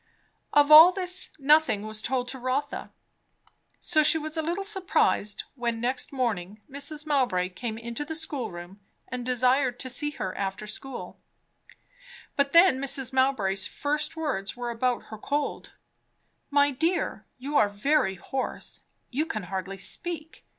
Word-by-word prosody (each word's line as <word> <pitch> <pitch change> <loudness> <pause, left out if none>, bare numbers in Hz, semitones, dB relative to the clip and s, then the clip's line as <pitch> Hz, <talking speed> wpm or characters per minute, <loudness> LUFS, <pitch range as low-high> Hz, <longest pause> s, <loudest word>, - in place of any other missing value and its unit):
Of 290 0 +4
all 320 +4 +11
this 365 0 -1
nothing 295 -7 +4
was 215 0 -4
told 250 +1 -1
to 265 - -4
Rotha. 260 +3 -2 0.9
So 315 -3 +3
she 310 +2 +4
was 310 0 -4
a 320 - 0
little 345 +5 -2
surprised, 370 - +1
when 235 -3 -2
next 250 +2 -2
morning 215 -7 -2
Mrs. 290 +2 -3
Mowbray 245 -12 +1
came 220 +4 -5
into 235 +4 -5
the 320 +2 -5
schoolroom 210 - -5 0.3
and 250 -1 -4
desired 250 +1 +2
to 260 - -4
see 295 - -1
her 185 - -3
after 195 +1 -3
school. 270 +5 -7 1.2
But 280 0 +1
then 335 -5 +6
Mrs. 270 -1 -1
Mowbray's 215 -8 +1
first 300 +2 -2
words 255 -10 -3
were 240 -1 -3
about 245 +1 0
her 215 - -7
cold. 285 +5 -3 0.8
"My 285 0 +4
dear, 330 +7 -1
you 280 +4 -5
are 205 - +4
very 205 0 +1
hoarse! 260 +9 -5 0.3
You 300 +6 0
can 215 - -3
hardly 190 +1 -5
speak. 320 - -5
265 Hz, 145 wpm, -27 LUFS, 220-300 Hz, 1.2 s, all